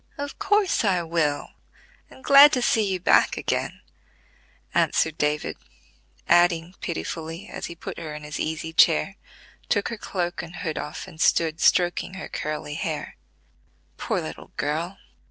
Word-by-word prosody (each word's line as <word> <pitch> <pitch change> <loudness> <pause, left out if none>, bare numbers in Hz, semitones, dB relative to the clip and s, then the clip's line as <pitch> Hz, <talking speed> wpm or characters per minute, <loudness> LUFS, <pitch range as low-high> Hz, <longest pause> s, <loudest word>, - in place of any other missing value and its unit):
"Of 285 0 -6
course 410 - +2
I 185 -5 +2
will, 155 -3 -1 0.6
and 260 - -16
glad 280 +1 +9
to 250 - +1
see 225 - +3
you 185 - -1
back 180 - +4
again," - - -2 0.9
answered 160 -1 +2
David, 150 0 -1 0.7
adding 175 0 +3
pitifully, 160 - -5
as - - -6
he 170 - -8
put 170 - -7
her 155 -3 -6
in 150 - -8
his 150 -1 -6
easy 160 +1 -3
chair, 75 - +4 0.5
took 205 - +1
her 230 - -6
cloak 175 -3 -3
and 170 0 -10
hood 160 -5 -3
off - - -6
and 160 - -10
stood 160 -1 +2
stroking 175 +1 +2
her 190 - -7
curly 150 -1 -4
hair: 155 -2 -4 0.8
"Poor - - -1
little - - -8
girl! 160 +6 -2
170 Hz, 150 wpm, -24 LUFS, 155-185 Hz, 0.9 s, glad